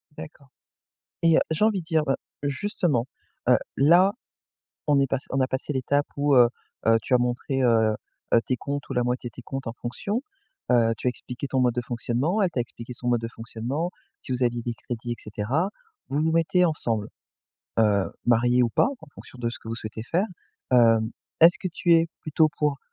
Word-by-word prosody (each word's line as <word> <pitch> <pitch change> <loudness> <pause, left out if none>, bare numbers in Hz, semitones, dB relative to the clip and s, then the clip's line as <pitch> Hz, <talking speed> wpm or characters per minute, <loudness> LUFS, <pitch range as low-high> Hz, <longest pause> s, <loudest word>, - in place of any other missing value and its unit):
D'accord 140 -2 -11 0.8
et 165 -1 +5
heu, - - +5
j'ai 160 +6 +2
envie 215 -3 +2
de 170 - -10
dire, 160 -2 +2
bah, 135 -2 +1 0.3
justement, 145 - 0 0.4
heu, - - +7 0.2
là, 175 +8 +5 0.8
on 145 -1 +4
est 140 - +3
passé 135 +1 -3
on 135 - -1
a 130 - +3
passé 130 +3 -2
l'étape 145 +2 0
où, 145 0 +3
heu 120 -2 +7 0.4
heu, 115 0 +6
tu 130 - +1
as - - +6
montré, 125 +2 -1
heu, 110 -3 +3 0.4
heu, 115 - +6
tes 130 - 0
comptes 140 +3 -5
ou - - -1
la 125 - +1
moitié 125 0 -2
de - - -19
tes 125 - -10
comptes 135 +2 -6
en 115 - -3
fonction, 200 - -3 0.5
heu, 115 -2 +4
tu - - -5
as 125 - +4
expliqué 125 +2 -5
ton 130 -1 +1
mode 125 -2 +2
de 125 - 0
fonctionnement, 125 - 0
elle 185 - +2
t'a 135 - -4
expliqué 120 0 -7
son 120 - -4
mode 120 -1 +2
de 115 - -4
fonctionnement, 120 +8 -4 0.3
si - - -2
vous 125 0 -1
aviez 120 -1 +1
des 120 0 -3
crédits 120 +1 -5
et - - -4
cetera, 120 - -2 0.4
vous 140 - -1
vous 160 +1 +1
mettez 165 +2 +3
ensemble, 115 -10 +1 0.7
heu, 105 -3 +4 0.2
mariés 120 +1 +4
ou 120 - +1
pas, - - +3
en - - -13
fonction 130 - -12
de 120 -1 -1
ce - - -5
que - - -11
vous 115 - -2
souhaitez 110 -1 -5
faire, 175 - 0 0.5
hem, 115 -2 +5 0.3
est-ce 170 +2 +7
que 185 - -3
tu 175 - +2
es 165 0 +4
plutôt 155 0 +2
pour 145 -2 +1
130 Hz, 210 wpm, -25 LUFS, 120-155 Hz, 0.8 s, heu